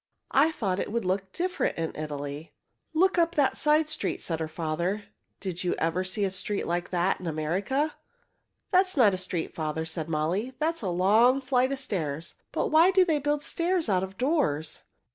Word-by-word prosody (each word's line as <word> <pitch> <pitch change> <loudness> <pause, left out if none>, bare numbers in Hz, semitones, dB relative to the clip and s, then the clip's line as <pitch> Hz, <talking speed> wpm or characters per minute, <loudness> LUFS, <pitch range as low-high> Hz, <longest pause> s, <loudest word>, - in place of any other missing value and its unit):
I 300 +4 +4
thought 195 -10 -1
it - - -3
would 230 -2 -1
look 190 +1 -1
different 360 - -1
in 165 -1 -3
Italy." 145 0 -5 0.4
"Look 360 +3 +3
up 335 0 +2
that 285 -3 +3
side 300 +1 +3
street," 310 0 -2
said 165 -2 -3
her 160 - -2
father. 170 +5 -2 0.4
"Did 185 -2 -4
you 180 - 0
ever 165 +3 0
see 185 +3 -2
a 195 - +1
street 200 +2 -2
like 175 +1 -2
that 180 +1 +1
in 180 - -6
America?" 190 - -1 0.8
"That 375 0 +5
is 370 - -7
not 215 -7 +6
a - - -1
street, 180 -2 -3
father," 160 0 -2
said 160 0 -5
Molly. 170 +11 -1
"That 315 +4 +1
is - - -9
a 195 - -2
long 215 +9 +4
flight 260 -1 +1
of 275 - -1
stairs. 165 - -3 0.2
But - - 0
why 320 +4 +6
do 380 -1 +5
they 315 -4 +1
build 290 +1 0
stairs 345 -4 0
out 185 -2 +3
of 190 0 -6
doors?" 250 - 0
195 Hz, 200 wpm, -27 LUFS, -, 0.8 s, not